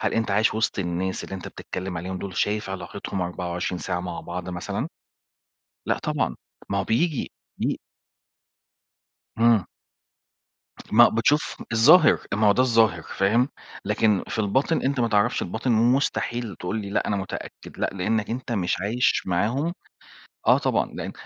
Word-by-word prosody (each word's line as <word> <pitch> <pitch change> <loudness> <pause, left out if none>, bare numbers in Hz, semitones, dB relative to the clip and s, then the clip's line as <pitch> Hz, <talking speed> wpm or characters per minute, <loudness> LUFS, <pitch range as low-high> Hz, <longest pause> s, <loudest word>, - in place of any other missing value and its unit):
هل - - 0
أنت 115 -2 0
عايش 105 +3 +3
وِسط 110 -2 0
الناس 95 +1 -2
اللي 95 - -7
أنت 95 - -6
بتتكلّم 90 -1 -6
عليهم 90 +2 -4
دُول، 95 -1 -6
شايف 105 -1 0
علاقتهم 95 0 -4
24 90 0 -3
ساعة 90 -1 -2
مع 90 -1 -5
بعض 90 +1 -6
مثلًا؟ 90 -1 -3 1.0
لأ - - +1
طبعًا، - - -1 0.3
ما 100 - +1
هو 95 - 0
بييجي 145 +6 0 0.3
بي - - 0 1.6
إمم. 115 -4 +4 1.3
ما - - +8
بتشوف 145 +7 +1 0.2
الظاهر، 150 +9 +7 0.2
ما 105 +1 +2
هو 100 - +7
ده 125 - +3
الظاهر 115 -3 +3
فاهم، 115 +7 +1 0.4
لكن 105 -1 +2
في - - -5
الباطن 130 +10 +1
أنت 135 0 0
ما 115 - +2
تعرفش 105 -2 +2
الباطن 115 +7 -1
ومستحيل 120 - +1
تقول 90 +5 -3
لي 100 -1 -6
لأ - - 0
أنا 100 - +1
متأكد، 95 -1 -7
لأ، - - 0
لإنّك 105 +3 -1
أنت 120 +1 -4
مش 90 -5 0
عايش 115 +6 +1
معاهم، 120 - 0 0.7
آه - - +6
طبعًا، - - 0
لإن - - -5
105 Hz, 150 wpm, -25 LUFS, 95-115 Hz, 1.6 s, ما